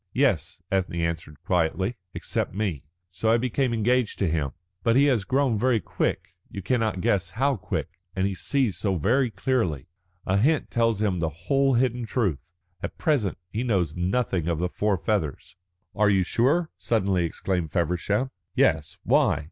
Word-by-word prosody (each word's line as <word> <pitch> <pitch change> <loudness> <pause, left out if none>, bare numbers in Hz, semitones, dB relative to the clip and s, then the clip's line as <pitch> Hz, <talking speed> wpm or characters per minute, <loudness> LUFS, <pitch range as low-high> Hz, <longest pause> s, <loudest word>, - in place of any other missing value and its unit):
"Yes," 95 - +1
Ethne 95 -2 0
answered 85 -3 -3
quietly, 90 +4 +1 0.2
"except - - -3
me. 95 -9 -1 0.3
So 90 +5 -1
I 115 - +5
became 125 +1 0
engaged 120 +1 +1
to 95 - +1
him. 70 -5 -1 0.3
But 115 -1 +2
he 135 - +6
has 125 -8 +2
grown 130 -4 +1
very 125 -1 +3
quick - - -2 0.2
you 100 - -7
cannot 110 -5 0
guess 95 0 +1
how 135 +4 +1
quick. 95 - -4 0.2
And 95 0 +1
he 100 - 0
sees 125 +2 0
so 100 -3 0
very 120 - +2
clearly. 90 - -1 0.4
A 95 - +2
hint 145 +9 +2
tells 115 -3 +1
him 95 -4 +1
the 80 -1 0
whole 135 - +1
hidden 120 -1 +1
truth. 90 - -1 0.3
At - - -5
present 140 - +1
he 110 - -2
knows 95 -11 0
nothing 90 -1 0
of 85 -2 0
the 90 +2 -1
four 105 +1 0
feathers." 80 -5 -2 0.4
"Are 105 0 +4
you 95 -2 +3
sure?" 145 - +1
suddenly 95 -6 +1
exclaimed 85 -1 -2
Feversham. 90 - 0 0.2
"Yes. 80 -4 +2
Why?" - - +3
100 Hz, 165 wpm, -26 LUFS, 90-125 Hz, 0.4 s, he